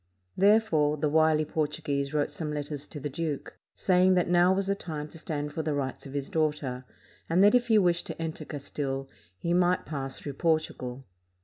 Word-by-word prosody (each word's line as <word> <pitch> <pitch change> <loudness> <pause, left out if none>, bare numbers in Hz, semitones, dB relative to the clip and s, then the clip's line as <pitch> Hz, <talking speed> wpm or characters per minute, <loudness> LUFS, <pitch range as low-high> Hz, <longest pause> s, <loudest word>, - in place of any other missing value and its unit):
Therefore, 190 -8 +4
the 150 +1 0
wily 155 0 +3
Portu 155 0 -2
guese 140 -1 -1
wrote 150 -1 0
some 150 0 -4
letters 145 -1 -4
to 150 - -8
the 145 - -3
duke, 150 0 -4 0.2
saying 185 0 +4
that 180 - +2
now 175 +1 +5
was 195 +1 +1
the 200 - +1
time 155 -6 -5
to 165 - -10
stand 150 -2 -4
for 160 - -2
the 155 -2 -1
rights 135 0 -3
of 135 - -10
his 140 -1 -2
daughter, 150 -5 -1 0.4
and 175 +4 +4
that 205 - +6
if 245 -1 +3
he 220 -2 +5
wished 175 -4 +2
to - - -6
enter 160 -1 -4
Castile, 135 -2 -4 0.3
he 170 - -1
might 180 0 +2
pass 135 -3 -4
through 145 - -6
Portugal. 135 -5 -1
155 Hz, 200 wpm, -28 LUFS, 145-175 Hz, 0.4 s, that